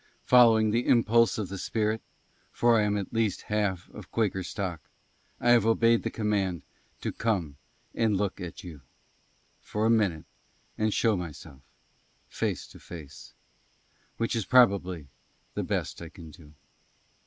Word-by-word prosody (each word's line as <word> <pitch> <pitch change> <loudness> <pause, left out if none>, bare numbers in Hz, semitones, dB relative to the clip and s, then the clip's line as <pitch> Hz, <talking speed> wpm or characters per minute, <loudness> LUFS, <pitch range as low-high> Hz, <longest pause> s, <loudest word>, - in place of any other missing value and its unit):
FOLLOWING 115 -3 +5
THE 120 +3 0
IMPULSE 115 -1 +4
OF 105 -4 -3
THE 100 0 -6
SPIRIT 110 +2 -1 0.5
(FOR 120 -1 +3
I 105 - +2
AM 105 0 0
AT 100 +1 -5
LEAST 110 -4 0
HALF 100 -4 -1
OF 105 -4 -11
QUAKER 105 -4 0
STOCK), 90 -2 -4 0.6
I 120 - +3
HAVE 120 -2 +5
OBEYED 115 0 +4
THE - - -2
COMMAND 100 -6 -1 0.4
TO - - -2
COME 90 -11 -2 0.4
AND 110 -3 +1
LOOK 100 -1 -2
AT 90 -2 -7
YOU, 80 -6 -10 0.8
FOR 105 +1 -2
A 115 - +4
MINUTE, 100 -9 +1 0.5
AND 110 0 0
SHOW 110 -2 +3
MYSELF, 80 -5 -8 0.7
FACE - - -3
TO - - -15
FACE; 75 -5 -11 0.8
WHICH 115 +1 -1
IS 115 -4 -1
PROBABLY 95 - +3 0.5
THE - - -2
BEST - - -3
I 85 - -7
CAN 80 -2 -12
DO. 75 -3 -16
105 Hz, 150 wpm, -28 LUFS, 90-115 Hz, 0.8 s, FOLLOWING